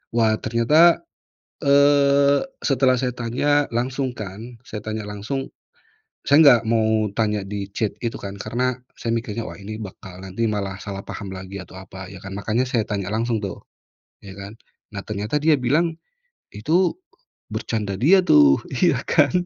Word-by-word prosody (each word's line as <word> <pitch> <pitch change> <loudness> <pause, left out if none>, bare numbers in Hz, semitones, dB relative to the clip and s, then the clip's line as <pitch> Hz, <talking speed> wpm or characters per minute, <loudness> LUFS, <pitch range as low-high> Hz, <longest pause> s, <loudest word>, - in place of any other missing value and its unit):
wah 110 -2 +3
ternyata, 150 - +4 0.6
eee, 140 0 +4 0.2
setelah 130 -2 +3
saya 125 0 -1
tanya 135 +5 0
langsung 125 +2 -2
kan, 100 -1 -7 0.2
saya 105 - -7
tanya 110 0 -5
langsung, 105 +7 -5 0.8
saya 145 - +6
nggak 120 -5 +7
mau 110 -1 +2
tanya 105 -2 +1
di 100 -1 -5
chat 110 0 -2
itu 115 - -3
kan, 100 0 -7
karena 125 +5 -1 0.2
saya 115 0 -1
mikirnya, 115 0 -4
wah - - -9
ini 110 +2 -8
bakal 95 -2 -9
nanti 95 +4 -3
malah 100 -3 -2
salah 100 -1 -5
paham 100 -2 -6
lagi 95 +1 -8
atau - - -18
apa, 95 0 -10
ya 95 - -10
kan, 95 0 -7
makanya 115 +6 -1
saya 115 -4 0
tanya 100 -3 -3
langsung 115 0 0
tuh, 100 -4 -6 0.6
ya 95 - -9
kan. 100 +3 -10 0.4
Nah 100 - -4
ternyata 105 +6 -2
dia 155 +2 +3
bilang 155 +7 +2 0.6
itu 165 - +1 0.6
bercanda 105 -4 -2
dia 170 - +5
tuh, 70 -2 +6 0.2
iya - - +2
kan, - - +3
110 Hz, 155 wpm, -22 LUFS, 100-130 Hz, 0.8 s, nggak